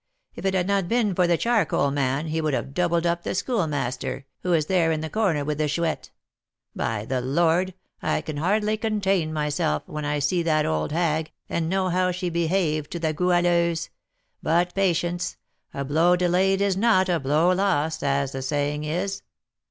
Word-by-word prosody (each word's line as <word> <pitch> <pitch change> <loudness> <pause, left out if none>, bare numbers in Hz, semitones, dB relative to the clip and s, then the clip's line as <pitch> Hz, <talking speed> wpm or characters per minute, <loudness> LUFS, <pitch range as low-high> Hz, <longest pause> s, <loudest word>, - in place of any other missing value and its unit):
If - - -8
it 190 - +1
had 180 -1 +1
not 200 -2 +1
been 230 -3 +1
for 180 0 +2
the 170 -1 +3
charcoal 215 -11 +1
man, 140 +1 0
he 160 +1 -1
would 155 -3 0
have 135 - -4
'doubled 170 0 +1
up' 170 0 +1
the - - -3
Schoolmaster, 145 - -2
who 180 - -2
is 160 -3 +3
there 170 -2 +2
in 155 -1 -1
the 160 - -5
corner 185 -10 +1
with 150 0 -2
the 155 - +1
Chouette. 160 +2 -2 0.7
By 110 -2 -2
the 130 +1 -1
Lord! 170 +7 +1 0.3
I 155 0 0
can 155 -1 -6
hardly 210 +6 +1
contain 195 -7 0
myself, 150 - -1
when 150 0 -6
I 145 0 -1
see 145 +5 +1
that 155 -2 +2
old 80 - -1
hag, 160 -1 0 0.2
and 165 -1 -1
know 190 0 +1
how 180 +1 +1
she 180 0 -2
behaved 165 -3 0
to 170 - -3
the 160 -1 0
Goualeuse, 175 -1 +1 0.5
but 175 +3 +1
patience, 175 -2 0 0.3
'a 140 - -4
blow 165 +5 +3
delayed 185 +2 +2
is 200 -2 +2
not 195 -2 +3
a 175 -2 +1
blow 150 +6 +2
lost,' 160 -5 0
as 140 -1 0
the 135 - -5
saying 145 +2 -1
is." 180 +6 -2
170 Hz, 185 wpm, -24 LUFS, 150-185 Hz, 0.7 s, the